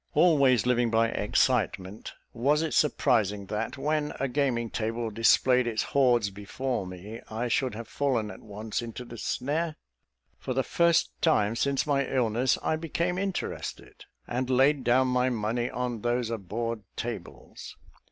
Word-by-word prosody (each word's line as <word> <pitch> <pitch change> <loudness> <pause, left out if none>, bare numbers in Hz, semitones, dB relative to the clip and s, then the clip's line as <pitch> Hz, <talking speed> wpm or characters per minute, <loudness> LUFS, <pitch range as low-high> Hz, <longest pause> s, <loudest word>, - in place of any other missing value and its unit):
Always 140 - +4
living 120 -1 +2
by 115 0 +3
excitement, 105 -3 0 0.2
was 145 +6 +2
it 160 - -2
surprising 110 -9 +2
that, 115 +5 -3
when 150 +2 -1
a 135 - 0
gaming 125 -4 0
table 115 0 -2
displayed 125 +3 +4
its 110 -2 0
hoards 120 -7 +2
before 105 +2 -3
me, 100 +5 -8
I 115 +3 -2
should 125 -1 0
have 115 0 -7
fallen 120 -7 -1
at - - -11
once 105 +1 -4
into 120 +1 -7
the 120 -1 -10
snare? 155 +8 -1 0.6
For 130 - -4
the 135 - +2
first 170 +3 +2
time 115 -10 +3
since 140 +3 +1
my 140 -2 +2
illness, 125 -1 +1
I 155 - +1
became 170 +2 -2
interested, 195 -2 -5 0.2
and 125 +1 -2
laid 135 +2 +3
down 130 +2 +3
my 125 0 +2
money 120 +1 -1
on 125 -3 -3
those 120 0 0
abhorred 115 +2 -3
tables. - - -7
125 Hz, 150 wpm, -28 LUFS, 115-135 Hz, 0.6 s, Always